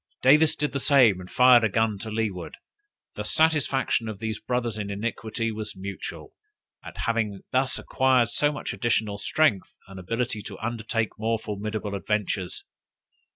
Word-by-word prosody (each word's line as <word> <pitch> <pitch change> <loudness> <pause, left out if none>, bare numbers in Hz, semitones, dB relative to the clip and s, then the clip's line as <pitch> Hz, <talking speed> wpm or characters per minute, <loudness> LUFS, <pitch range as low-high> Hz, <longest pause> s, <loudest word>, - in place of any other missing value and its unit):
Davis 150 +4 +6
did 150 0 -1
the 140 - -2
same, 130 -9 +5
and 90 0 -10
fired 125 -2 +6
a 110 - +3
gun 110 0 0
to 110 - -6
leeward. 105 -5 -3 0.6
The - - -5
satisfaction 140 -7 +1
of 110 - -6
these 110 0 -4
brothers 120 -3 -2
in 105 -2 -4
iniquity 115 +2 -3
was 110 -1 -5
mutual, 100 +1 -7 0.5
at - - -10
having 110 -4 -1
thus 130 +1 +2
acquired 130 -3 +2
so 145 +5 +2
much 150 - -5
additional 110 -4 0
strength 110 -7 +1
and 95 0 -10
ability 115 +3 -2
to - - -9
undertake 115 -1 -3
more 115 +1 0
formidable 105 -1 -4
adventures. 100 -2 -2
110 Hz, 155 wpm, -26 LUFS, 105-125 Hz, 0.6 s, Davis